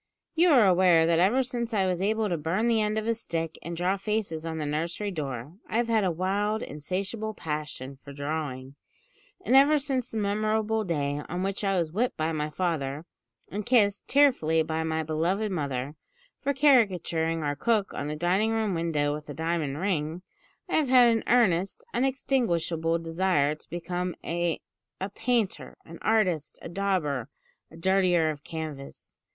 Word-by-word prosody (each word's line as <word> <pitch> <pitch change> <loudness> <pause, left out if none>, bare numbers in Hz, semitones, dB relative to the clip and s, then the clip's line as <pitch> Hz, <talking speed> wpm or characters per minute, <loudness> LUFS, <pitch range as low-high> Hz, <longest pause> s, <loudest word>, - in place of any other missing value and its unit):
"You 345 +2 +4
are 255 -8 +6
aware 180 -3 +5
that 165 0 +3
ever 220 +9 +4
since 240 -2 -3
I 195 -2 +2
was 180 -1 -1
able 215 +2 +1
to 175 - 0
burn 170 +9 0
the 230 -2 +3
end 210 0 0
of 215 - -1
a 230 - +2
stick 165 -7 -4
and 170 0 -6
draw 185 +3 +1
faces 195 -6 -2
on 160 0 -4
the 155 - -2
nursery 170 +7 -2
door, 140 -4 -5 0.2
I 220 - 0
have 235 0 +1
had 220 -2 +3
a 190 - +2
wild, 200 +5 -1
insatiable 195 +8 -4
passion 150 -5 -5
for 140 - -10
drawing; 140 -2 -4 0.7
and 255 - +3
ever 285 +3 +7
since 270 -4 -1
the 225 - -5
memorable 215 +1 0
day 145 -5 -1
on 180 +2 -2
which 195 +2 -2
I 195 -1 +1
was 165 -3 0
whipped 235 +8 -1
by 160 +1 0
my 155 -1 -2
father, 155 -3 -2 0.5
and 210 +2 -3
kissed, 205 -4 +2
tearfully, 245 - +4
by 160 0 -2
my 160 0 -1
beloved 175 +7 0
mother, 140 -5 -2 0.5
for 280 - +1
caricaturing 185 - +2
our 145 -1 -1
cook 210 +6 0
on 145 - -4
the 150 - -3
dining 180 +7 +1
room 220 -3 0
window 160 -4 0
with 150 0 -7
a 145 - -6
diamond 160 -3 -1
ring, 170 -2 -2 0.4
I - - +1
have 300 -4 +1
had 250 -2 +7
an 225 -1 +1
earnest, 215 - +2
unextinguishable 175 - 0
desire 165 -3 +1
to 155 - -14
become 175 +1 -3
a 170 0 -1 0.4
a 190 +1 -4
painter, 235 -3 -1
an 170 0 -11
artist, 185 -9 +1
a - - -6
dauber, 170 - -1 0.4
a 165 - -14
dirtier 180 -2 +3
of 150 -1 -9
canvas. 155 -4 -7
180 Hz, 175 wpm, -27 LUFS, 160-215 Hz, 0.7 s, ever